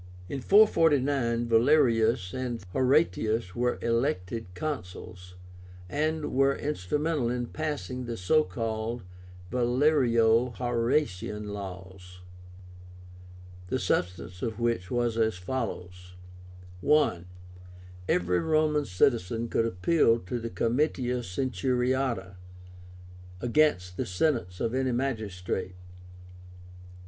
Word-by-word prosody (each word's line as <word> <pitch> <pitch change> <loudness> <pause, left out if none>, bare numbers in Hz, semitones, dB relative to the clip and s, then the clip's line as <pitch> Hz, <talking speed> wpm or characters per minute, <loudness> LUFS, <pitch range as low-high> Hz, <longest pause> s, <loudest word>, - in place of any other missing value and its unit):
In 135 +4 -5
449 140 - +3
Valerius 115 -5 +3
and 125 -4 -4
Horatius 125 - +1
were 125 0 0
elected 115 -3 -1
Consuls, 90 - -6 0.5
and 155 - -1
were 135 +1 +3
instrumental 150 - -1
in 120 0 -2
passing 140 -3 -4
the 120 -1 -5
so 125 +13 +3
called 115 -2 -4 0.5
VALERIO 120 -2 +3
HORATIAN 115 -4 -1
laws, 95 -2 -9 1.5
the - - -1
substance 90 0 -2
of 115 -1 -3
which 115 -6 -1
was 120 -2 0
as 110 -2 +2
follows: 90 -4 -5 0.7
I. 145 - +3 0.8
Every 90 0 +2
Roman 155 -2 +1
citizen 115 +2 +1
could 115 - +1
appeal 115 - +3
to 120 +4 -5
the 115 0 -5
Comitia 125 +1 0
Centuriáta 125 -2 -1 1.0
against 115 -8 +1
the - - -2
sentence 90 - -1
of 115 0 -1
any 130 -1 0
magistrate. 100 -8 -3
120 Hz, 95 wpm, -28 LUFS, 95-135 Hz, 1.5 s, 449